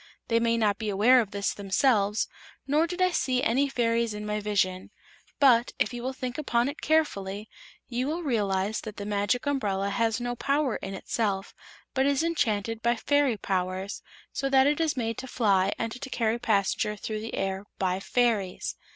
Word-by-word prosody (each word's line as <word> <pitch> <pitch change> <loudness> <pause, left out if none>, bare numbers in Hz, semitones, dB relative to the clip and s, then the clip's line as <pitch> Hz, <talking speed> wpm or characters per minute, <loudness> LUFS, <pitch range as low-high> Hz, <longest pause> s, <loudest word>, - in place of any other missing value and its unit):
They 230 0 +3
may 230 0 +2
not 210 -3 +1
be 220 -2 -2
aware 230 +6 +5
of 215 - -4
this 200 0 -1
themselves, 205 +1 +1 0.4
nor 300 +4 +2
did 360 +2 -1
I 365 - +3
see 255 -6 0
any 275 +5 +2
fairies 230 -3 0
in 210 0 -5
my 210 0 -1
vision. 190 -3 0 0.5
But, 245 -4 +5
if - - 0
you 240 - -5
will 255 +2 -2
think 255 0 -5
upon 240 -4 +1
it 285 - -8
carefully, 210 -10 0 0.4
you 250 +2 -2
will 330 +4 -2
realize 205 -6 0
that 215 -2 -8
the 200 - -5
Magic 205 +5 0
Umbrella 200 -8 0
has 225 +3 +1
no 245 0 -3
power 275 -1 0
in 195 0 -6
itself, 195 -1 -2 0.4
but 265 0 +2
is 280 +2 +2
enchanted 225 -9 0
by 235 +1 +2
fairy 285 -1 +2
powers, 185 +1 -2 0.3
so 275 - -1
that 265 -1 +5
it 295 +3 +2
is 310 -4 0
made 230 -2 -2
to 260 - -6
fly 200 -6 +2
and 230 -1 -2
to 250 +3 -7
carry 230 -2 0
passengers 210 -1 0
through 215 +1 -4
the 225 - -5
air 195 +1 -2
by 185 -1 0
fairies. 215 -4 0
230 Hz, 185 wpm, -27 LUFS, 200-260 Hz, 0.5 s, aware